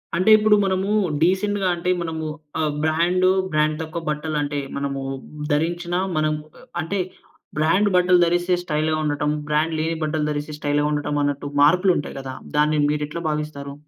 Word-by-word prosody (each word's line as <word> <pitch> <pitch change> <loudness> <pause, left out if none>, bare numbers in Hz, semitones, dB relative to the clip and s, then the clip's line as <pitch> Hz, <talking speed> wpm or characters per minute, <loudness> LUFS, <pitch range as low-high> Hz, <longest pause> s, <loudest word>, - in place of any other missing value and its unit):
అంటే 185 +5 +2
ఇప్పుడు 210 0 +4
మనము 190 +1 0 0.3
డీసెంట్‌గా 190 +2 +2
అంటే 175 +1 -3
మనము 160 -1 -4 0.3
ఆహ్, 155 -2 0
బ్రాండు 175 +4 +2 0.2
బ్రాండ్ 155 0 +1
తక్కువ 160 +1 -5
బట్టలు 150 0 -2
అంటే 145 0 -2 0.2
మనము 140 -1 -3 0.5
ధరించిన 170 +3 0 0.2
మనం 155 0 +2 0.3
ఆహ్, - - -17
అంటే 190 +5 -2 0.6
బ్రాండు 185 +7 +3
బట్టలు 180 0 +5
ధరిస్తే 175 +1 +1
స్టైల్‌గా 155 -1 0
ఉండటం, 150 0 0 0.2
బ్రాండ్ 155 +2 +1
లేని 165 +1 -1
బట్టలు 155 0 -1
ధరిస్తే 150 +1 -4
స్టైల్‌గా 145 0 +1
ఉండటం 145 0 -1
అన్నట్టు 145 0 -2
మార్పులు 180 +6 +5
ఉంటాయి 145 - -5
గదా! 135 -1 -6 0.2
దాన్ని 150 +1 +3
మీరు 150 0 0
ఎట్లా 170 +3 -6
భావిస్తారు? 150 -2 -4
155 Hz, 155 wpm, -22 LUFS, 150-175 Hz, 0.6 s, బట్టలు